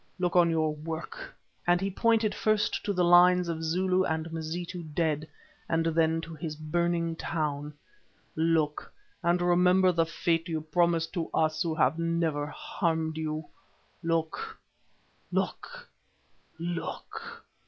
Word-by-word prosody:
Look 180 -1 -1
on 175 -1 +6
your 160 -2 +1
work!" 160 +2 -6 0.4
and 175 0 +4
he 195 +1 -1
pointed 225 +1 +2
first 215 -1 +1
to 205 - +1
the 180 -2 +1
lines 175 +1 +6
of 165 -1 -3
Zulu 185 +3 +2
and 160 -1 -2
Mazitu 170 +2 -4
dead, 155 -1 -1 0.4
and 165 0 +1
then 165 0 +2
to 165 0 -8
his 155 0 -5
burning 170 +2 0
town. 150 -3 -3 0.6
"Look 160 -2 +1 0.3
and 175 0 +2
remember 180 +1 +4
the 165 -2 +1
fate 165 0 0
you 160 -1 -1
promised 165 +1 +1
to 170 -4 -2
us 155 -1 +1
who 165 -2 0
have 155 0 +2
never 165 -3 0
harmed 160 +1 -2
you. 155 0 -3 0.6
Look! 165 - -2 0.7
Look! - - -3 0.7
Look! 170 0 -6
165 Hz, 130 wpm, -29 LUFS, 160-175 Hz, 0.7 s, on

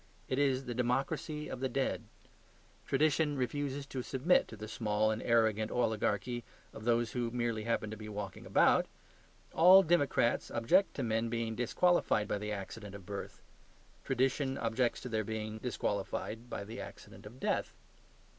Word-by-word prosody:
It 130 - -1
is 135 -2 +2
the 120 - -3
democracy 135 +5 -1
of 130 - -6
the 130 0 -1
dead. 135 +2 -1 0.8
Tradition 150 +1 +2
refuses 140 +2 -2
to 135 -2 -4
submit 135 +8 +2
to 110 - -10
the 110 +1 -7
small 110 -1 +1
and 110 - -2
arrogant 110 -2 +2
oligarchy 120 0 0 0.3
of 110 - -9
those 120 -1 +2
who 120 -2 -1
merely 115 -2 -2
happen 110 -2 -1
to - - -4
be 105 0 -8
walking 100 -2 -6
about. - - +4 0.7
All 185 +3 +8
democrats 150 -8 +2
object 180 +13 +2
to 135 - -2
men 115 0 0
being 115 -1 -2
disqualified 120 - +2
by 105 - -1
the 105 +1 -4
accident 100 0 -6
of 100 -3 -10
birth; 100 0 -7 0.6
tradition 135 +1 0
objects 115 +2 0
to 125 - -6
their 110 -1 0
being 110 +1 -4
disqualified 115 +2 -3
by 100 - -4
the 110 +3 -7
accident - - -11
of 120 +5 -13
death. - - 0
120 Hz, 160 wpm, -33 LUFS, 110-135 Hz, 0.8 s, All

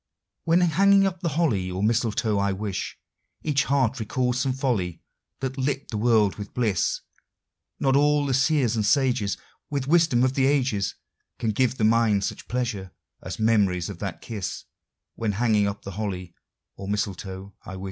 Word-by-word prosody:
When 165 +2 +4
hanging 195 +4 +5
up 185 -2 -2
the 170 -2 -1
holly 105 - +1
or 90 +2 -3
mistletoe, 110 -1 +1
I 100 0 +1
wis 95 -1 -4 0.5
Each 145 -2 +1
heart 130 -3 +1
recalls 125 +3 -1
some 130 0 +1
folly 115 - -1 0.4
that 135 0 -3
lit 135 +1 -1
the 110 - -2
world 110 -3 +3
with 100 -1 -8
bliss. 110 -8 0 0.8
Not 135 -1 +2
all 145 0 +3
the 135 - 0
seers 130 -3 +2
and 110 - +1
sages 115 -4 +2 0.3
With 140 -2 -2
wisdom 160 -6 +4
of 130 0 +2
the 135 -1 +2
ages 130 -9 +1 0.4
Can 110 - 0
give 130 +3 +1
the 110 - -1
mind 110 -2 +3
such - - -4
pleasure 115 -6 -2 0.3
as 95 - -6
memories 105 -6 +2
of 90 - -10
that 95 -4 -5
kiss 105 -5 -5 0.5
When 110 -3 -2
hanging 105 -1 +2
up 100 0 -5
the 100 - -6
holly 95 -3 -4 0.4
or 100 - -7
mistletoe, 100 -1 -4
I 95 - -8
wis. - - -7
115 Hz, 170 wpm, -25 LUFS, 100-135 Hz, 0.8 s, hanging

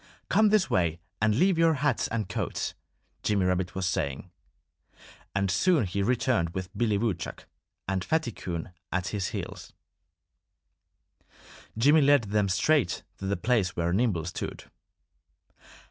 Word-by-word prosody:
"Come 215 0 +5
this 210 -2 +3
way 85 -3 +1 0.2
and 110 -1 +3
leave 180 - +3
your 165 -1 +4
hats 140 -3 +1
and 110 -4 -2
coats!" - - -3 0.5
Jimmy 100 -3 +1
Rabbit 90 0 0
was 95 0 -1
saying. 90 -2 -2 1.0
And 100 -1 +1
soon 155 - +3
he 95 +2 -2
returned 120 -6 +1
with 95 +1 -5
Billy 105 -1 +1
Woodchuck 100 -6 -3 0.4
and 95 -2 -1
Fatty 160 -3 0
Coon 85 -4 -5 0.2
at 90 -1 -1
his 100 -4 -2
heels. - - -6 2.0
Jimmy 145 +7 +5
led 140 -2 +5
them 105 -1 0
straight 145 +8 +2 0.2
to 95 - -4
the 100 - 0
place 110 -6 +1
where 85 0 0
Nimble 95 -6 +1
stood. 85 - -5
100 Hz, 135 wpm, -28 LUFS, 90-130 Hz, 2.0 s, Come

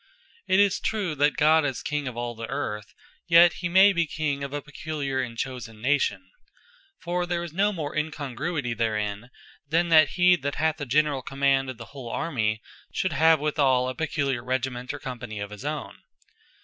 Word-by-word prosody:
It 190 - +4
is 200 -2 +3
true, 205 -7 -1
that 145 +1 +2
God 155 +1 +5
is 135 -4 -2
King 150 -1 -2
of 125 -2 -6
all 120 0 -3
the 115 0 -7
Earth: 110 -6 -4 0.3
Yet 170 0 +7
may 185 +2 +5
he - - +1
be 170 -2 +1
King 145 -3 -2
of 140 - -5
a 145 - -2
peculiar, 145 -2 -4
and 120 -2 -6
chosen 120 -4 -5
Nation. 145 - 0 0.7
For 175 +1 -2
there 175 -1 -1
is 170 -3 -8
no 200 +4 +2
more 155 -7 -5
incongruity 150 -2 -3
therein, 110 0 -2 0.4
than 170 +2 +2
that 155 -2 +6
he 180 0 +6
that 140 -1 -3
hath 160 0 0
the 145 -3 -5
generall 145 +1 +2
command 135 0 +1
of 130 - -6
the 115 - -9
whole 130 -4 -8
Army, 110 -7 -1 0.3
should 185 -3 -1
have 160 +2 +5
withall 140 -4 +2
a 130 - -2
peculiar 140 -5 -2
Regiment, 125 -1 -2
or 145 - -6
Company 120 -5 -7
of 100 0 -5
his 105 -1 -9
own. - - -5
140 Hz, 190 wpm, -26 LUFS, 125-160 Hz, 0.7 s, Yet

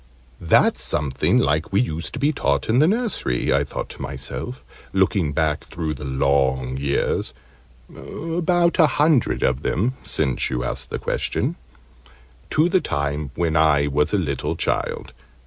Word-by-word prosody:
"That's 80 - +3
something 70 -3 0
like 75 +2 +2
what - - -17
we 100 - +4
used 85 -9 -3
to 140 - -5
be 145 +3 +2
taught 70 - 0
in 115 +3 +4
the 155 - +5
nursery," 210 - 0
I - - +3
thought - - -5
to - - -10
myself, 65 0 -6 0.3
looking 95 -4 +2
back 75 0 0
through 80 -2 -4
the 75 - -9
long 65 -1 +1
years 70 +1 -1 0.6
(about 170 +2 0
a 160 - +7
hundred 150 -4 +2
of 65 +1 +1
them, 115 +11 0
since 65 -5 -1
you 60 - -2
ask 60 - -4
the - - -3
question), - - -2 0.9
to 155 +3 +3
the 180 0 +2
time 70 0 -2
when 85 -2 0
I 75 -2 +4
was 75 +1 +1
a 105 - +2
little 75 -8 -2
child. - - -2
75 Hz, 160 wpm, -22 LUFS, -, 0.9 s, a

